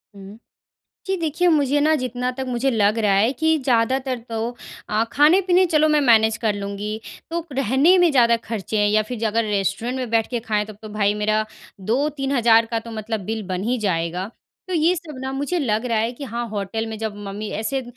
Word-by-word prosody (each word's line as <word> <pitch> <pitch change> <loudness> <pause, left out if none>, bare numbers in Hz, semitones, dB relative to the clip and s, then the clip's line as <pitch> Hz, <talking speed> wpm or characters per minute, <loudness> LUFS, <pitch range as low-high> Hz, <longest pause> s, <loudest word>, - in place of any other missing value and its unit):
हुँ, 200 +1 -11 0.7
जी 385 0 0
देखिए 335 +1 0
मुझे 290 -3 +2
ना 310 +2 +3
जितना 250 -2 -2
तक 265 - -2
मुझे 250 +2 0
लग 215 -2 +2
रहा 210 -3 +2
है 215 +6 +3
कि 320 +4 +2
ज़्यादातर 255 +1 +1
तो 225 +1 -2 0.4
अ, 215 +2 +1
खाने-पीने 360 +6 +4
चलो 310 -2 +3
मैं 300 -1 +3
मैनेज़ 225 -4 +4
कर 220 -3 0
लूँगी 205 +2 -5 0.3
तो 335 0 -3
रहने 275 - +3
में 350 -2 +5
ज़्यादा 235 -4 +4
ख़र्चे 215 -2 -4
हैं 205 0 +3
या 215 +1 +3
फ़िर 235 +3 -6
ज - - -1
अगर 225 +2 +1
रेस्टोरेंट 205 +4 -1
में 250 -3 -4
बैठ 225 -1 +2
के 240 -2 -2
खाएँ 215 -2 -1
तब 215 -1 -11
तो 215 - -8
भाई 210 -1 0
मेरा 215 +1 0 0.4
2-3 275 +6 -1
हज़ार 230 -1 +5
का 230 0 -2
तो 230 - -10
मतलब 220 0 -4
बिल 220 0 -3
बन 185 0 -3
ही 245 +3 0
जाएगा। 180 -3 -1 0.4
तो 370 - -2
ये 335 +2 +3
सब 305 -5 -8
ना, 265 - -3
मुझे 285 +6 -2
लग 225 -6 0
रहा 230 -2 0
है 225 +2 0
कि 280 +3 -8
हाँ 235 -1 -4
होटल 210 +1 -3
में 220 0 -5
जब 220 -1 -4
मम्मी 205 +2 -5
ऐसे 260 +5 -2
230 Hz, 215 wpm, -22 LUFS, 215-275 Hz, 0.7 s, में